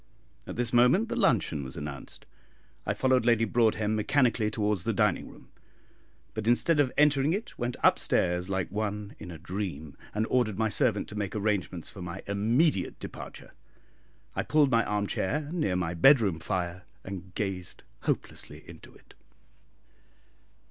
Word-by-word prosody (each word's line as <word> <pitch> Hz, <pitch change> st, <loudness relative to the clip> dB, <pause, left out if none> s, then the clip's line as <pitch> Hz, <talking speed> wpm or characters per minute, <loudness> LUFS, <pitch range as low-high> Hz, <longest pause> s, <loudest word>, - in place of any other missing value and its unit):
At -, -, -6 dB
this 120 Hz, 0 st, -1 dB
moment 125 Hz, -, +4 dB
the -, -, -2 dB
luncheon 85 Hz, -, +2 dB
was 65 Hz, -1 st, -7 dB
announced. 70 Hz, -1 st, -7 dB, 0.6 s
I -, -, 0 dB
followed 130 Hz, -2 st, +3 dB
Lady 115 Hz, -1 st, +3 dB
Broadhem 110 Hz, -2 st, +2 dB
mechanically 115 Hz, 0 st, +2 dB
towards 105 Hz, -4 st, 0 dB
the -, -, 0 dB
dining -, -, +1 dB
room, -, -, -16 dB, 0.8 s
but 110 Hz, 0 st, -4 dB
instead 145 Hz, +6 st, +3 dB
of 135 Hz, -3 st, +3 dB
entering 145 Hz, 0 st, +4 dB
it 215 Hz, +5 st, -4 dB
went 120 Hz, 0 st, -2 dB
up -, -, +5 dB
stairs 90 Hz, +1 st, +1 dB
like 95 Hz, -1 st, -2 dB
one 105 Hz, 0 st, -3 dB
in -, -, -8 dB
a 85 Hz, -, -7 dB
dream, 85 Hz, -4 st, -5 dB, 0.2 s
and 110 Hz, +1 st, +1 dB
ordered 120 Hz, -6 st, +2 dB
my 110 Hz, 0 st, +1 dB
servant 105 Hz, 0 st, +1 dB
to 105 Hz, -, -8 dB
make 100 Hz, -1 st, -3 dB
arrangements 100 Hz, -5 st, -1 dB
for 95 Hz, -, -10 dB
my 90 Hz, +2 st, -6 dB
immediate 110 Hz, -, +1 dB
departure. -, -, -9 dB, 0.8 s
I -, -, +1 dB
pulled 145 Hz, -4 st, +3 dB
an 115 Hz, 0 st, +4 dB
arm 105 Hz, 0 st, 0 dB
chair 145 Hz, +10 st, -1 dB
near 155 Hz, -, 0 dB
my 90 Hz, -2 st, -1 dB
bedroom 100 Hz, -, +5 dB
fire, 90 Hz, +1 st, -3 dB, 0.2 s
and 95 Hz, -1 st, -8 dB
gazed 95 Hz, -4 st, -4 dB, 0.2 s
hopelessly -, -, -4 dB
into -, -, -13 dB
it. -, -, -20 dB
105 Hz, 155 wpm, -28 LUFS, 95-120 Hz, 0.8 s, up